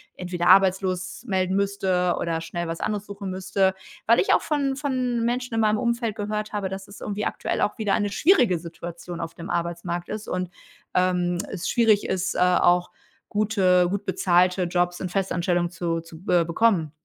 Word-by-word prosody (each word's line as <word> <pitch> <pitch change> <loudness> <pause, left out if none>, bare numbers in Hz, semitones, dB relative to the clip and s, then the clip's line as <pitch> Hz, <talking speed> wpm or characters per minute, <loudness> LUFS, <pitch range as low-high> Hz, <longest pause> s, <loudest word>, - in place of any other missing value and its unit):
entweder 175 -1 -2
arbeitslos 185 0 +3
melden 190 -4 0
müsste 190 -3 +1
oder 165 -1 -2
schnell 170 +1 -4
was 165 0 -4
anderes 210 -1 -3
suchen 200 -1 -6
müsste, 190 +1 +1 0.3
weil 230 - +5
ich - - +3
auch - - +1
von 280 -3 0
von 255 -4 -1
Menschen 245 0 -2
in 225 - +2
meinem 215 0 +2
Umfeld 235 -3 -1
gehört 210 0 -3
habe, 200 -2 -2
dass 195 +1 -7
es 200 - -13
irgendwie 210 0 -3
aktuell - - -2
auch 210 - 0
wieder 205 -3 +1
eine 205 -1 -1
schwierige 245 - +3
Situation 170 +1 -8
auf 165 -1 -5
dem 170 +2 -9
Arbeitsmarkt 170 0 -3
ist 215 0 -5
und, 180 -1 -3 0.4
ähm, 180 -1 +1
es 180 -4 -4
schwierig 220 -3 +3
ist, 190 0 -1
äh, - - -1
auch 180 0 +3 0.4
gute 195 -4 +3
gut 200 +1 -3
bezahlte 180 0 +2
Jobs 175 0 0
in 185 - -4
Festanstellung 175 -2 0
zu 165 -1 -2
zu, 165 -1 -13
äh, 175 -1 +4
bekommen. 170 -3 +2
185 Hz, 180 wpm, -24 LUFS, 175-210 Hz, 0.4 s, weil